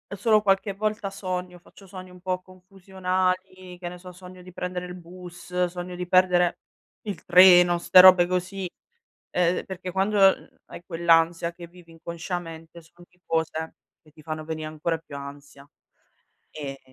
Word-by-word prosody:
solo 215 +2 +3
qualche 195 0 +1
volta 210 0 -3
sogno, 185 -2 -5
faccio 195 +3 -18
sogni 185 0 -10
un 180 0 -16
po' 185 0 -2
confusionali, 185 0 -4
che 175 - -6
ne 180 - -10
so, 180 +1 -12
sogno 180 0 -13
di 185 +1 -13
prendere 180 0 -5
il 180 0 -8
bus, 180 0 -5
sogno 180 0 -7
di 180 0 -5
perdere 180 -1 +3 0.4
il 205 -2 -6
treno, 180 -1 +7
ste 175 +1 +5
robe 185 -1 +8
così. 185 +1 -3 0.7
Uhm, 180 0 +1
perché 185 -1 -7
quando, 195 +3 0
mhmm, 195 -1 +3
hai - - -11
quell'ansia 165 0 +2
che 170 0 -11
vivi 170 0 -18
inconsciamente, 165 0 -7
son 175 +2 -19
di 180 0 -33
cose 160 0 -2 0.3
che 155 - -22
ti 155 0 -17
fanno 155 0 -6
veni 155 0 -5
ancora 155 +2 -3
più 150 -3 -11
ansia. 140 0 -11 0.8
E 140 -3 -7
180 Hz, 160 wpm, -25 LUFS, 170-185 Hz, 0.8 s, robe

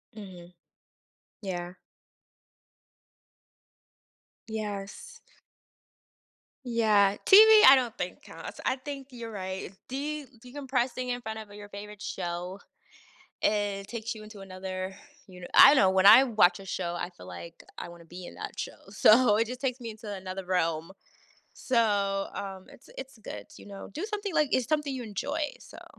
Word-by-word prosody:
Mhm. 180 -4 -11 0.9
Yeah. 175 -2 -5 2.7
Yes. 210 -2 -6 1.5
Yeah. 215 -4 +3
TV, 435 +2 +9
I 270 - +11
don't 245 -4 -1
think 180 0 -5
counts, - - -10
I 255 - +2
think 275 0 -8
you're 235 -2 -8
right, 190 -1 -5 0.2
de 290 +3 -4 0.2
decompressing 255 -1 -2
in 245 0 -2
front 220 0 -6
of 210 -2 -11
your 205 0 -11
favorite 205 0 -10
show, 180 +1 -5 0.8
it 205 -2 0
takes 235 0 -4
you 215 - -10
into 215 -1 -12
another, 185 0 -6 0.3
you 180 -1 -13
kn - - -7
I - - +10
don't - - +3
know, 190 -5 +5
when 190 0 +2
I 230 +6 +10
watch 205 -7 +3
a 195 - -11
show, 175 -1 -3
I 175 - -4
feel 90 - -13
like 165 - -10
I - - -6
wanna 170 -1 -13
be 175 +2 -10
in - - -10
that - - -7
show. - - -5
So, 215 +1 +5
it 225 0 +1
just 250 +2 -7
takes 260 -1 -1
me 230 -2 -6
into 215 -1 -9
another 190 -1 -6
realm. 165 -2 -1 0.7
So, 205 -5 +1
um, 195 -1 -6
it's - - -17
it's 265 -3 -9
good, 105 - -8
you - - -13
know? 200 -1 -9
Do 335 - -3
something, 410 -4 -3
like, 305 -3 +3
it's 255 -2 +2
something 300 -3 0
you 250 - -5
enjoy, 285 +8 -3
so - - -13
210 Hz, 155 wpm, -28 LUFS, 190-250 Hz, 2.7 s, I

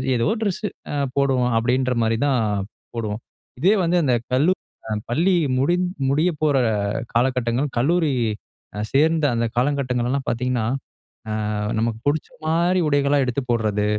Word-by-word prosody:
ஏதோ 115 - +1
ட்ரெஸ்ஸு 210 0 -1 0.5
போடுவோம். 130 -3 +2
அப்படின்ற 125 +2 +1
மாரி 115 0 +1
தான் 130 -4 +2 0.5
போடுவோம். 110 -1 -3 0.4
இதே 185 +9 +4
வந்து 175 +1 +2
அந்த 130 -4 +2 0.2
கல்லூரி 150 +9 +3 0.5
பள்ளி 170 +10 +2 0.2
முடி 140 +7 +2 0.3
முடிய 155 +6 +2
போகிற 150 -3 +3 0.6
காலகட்டங்கள். 125 +2 +1
கல்லூரி 155 +4 +2 0.8
சேர்ந்த 155 +2 +3
அந்த 115 0 +1
காலகட்டங்களெல்லாம் 130 -1 0
பார்த்தீங்கன்னா, 125 -1 -1 0.6
அ - - -2 0.5
நமக்கு 115 0 -1
பிடிச்ச 150 +1 +1 0.2
மாதிரி 170 +3 +2
உடைகளா 145 0 +2
எடுத்து 125 +2 -1
போடுறது. 105 -3 +1
135 Hz, 120 wpm, -22 LUFS, 120-155 Hz, 0.8 s, இதே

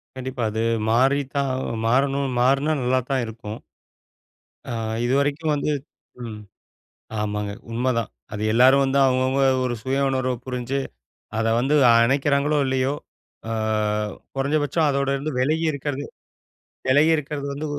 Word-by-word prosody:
கண்டிப்பா. 130 -1 -4
அது 110 +1 -1 0.3
மாரிதான் 135 +2 +1 0.2
ஆ - - -4
மாறணும், 135 +3 +2
மாறுனா 135 +5 +3
நல்லா 130 +1 +2
தான் 135 -2 +1
இருக்கும். 110 -1 -8 1.1
ஆ, - - -3 0.3
இதுவரைக்கும் 140 +4 +1
வந்து 145 +1 -1 0.5
ம். 110 -2 -7 0.8
ஆமாங்க, 105 -1 -2 0.2
உண்மதான். 115 -1 0 0.2
அது 105 - -4
எல்லாரும் 130 +3 +6
வந்து 135 0 +1
அவுங்க, 130 -1 +3
அவுங்க 135 +1 +1 0.2
ஒரு 120 -1 -1
சுய 135 +1 0
உணர்வ 130 -1 0
புரிஞ்சு, 125 +1 -2 0.6
அத 115 - 0
வந்து 135 +4 +2 0.2
அணைக்கிறாங்களோ! 140 +5 +3
இல்லையோ! 130 +1 0 0.6
ஆ - - -2 0.8
குறைந்தபட்சம் 145 +3 +1
அதோட 140 0 0
இருந்து 145 +3 -3
விலகி 155 +5 +1
இருக்கிறது, 145 0 -4 0.8
விலகி 145 +5 +5
இருக்கிறது 145 -1 -4
வந்து 145 +2 -5
135 Hz, 125 wpm, -23 LUFS, 125-140 Hz, 1.1 s, எல்லாரும்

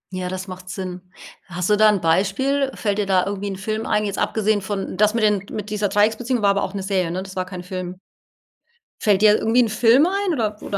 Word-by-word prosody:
Ja, 180 -1 -3
das 185 +1 -5
macht 185 0 -9
Sinn. 185 0 -6 0.5
Hast 180 +2 -2
du - - +6
da 215 +1 +5
'n 205 -2 +2
Beispiel? 205 +12 +1
Fällt 205 -1 -1
dir 205 - -1
da 185 -2 +2
irgendwie 200 0 -4
'n 195 - -4
Film 215 +3 -4
ein, 210 0 +1
jetzt 200 - -3
abgesehen 215 -1 +1
von 195 0 -4
das 210 +3 +2
mit 230 - 0
den, 205 -2 +2
mit 210 0 -6
dieser 210 -1 0
Dreiecksbeziehungen, 220 +3 +1
war 200 - +5
aber 200 0 0
auch 190 +1 -4
'ne 195 - -3
Serie, 190 -3 0
ne? 185 +3 -3
Das 190 -1 -11
war 185 -1 -2
kein 180 -1 -8
Film. 180 0 -6 1.0
Fällt 205 -2 +3
dir 215 -1 +6
irgendwie 235 +3 +2
'n 230 - +1
Film 235 +7 +4
ein 390 0 0
oder 215 -6 -2
oder 200 - -4
205 Hz, 240 wpm, -21 LUFS, 185-215 Hz, 1.0 s, du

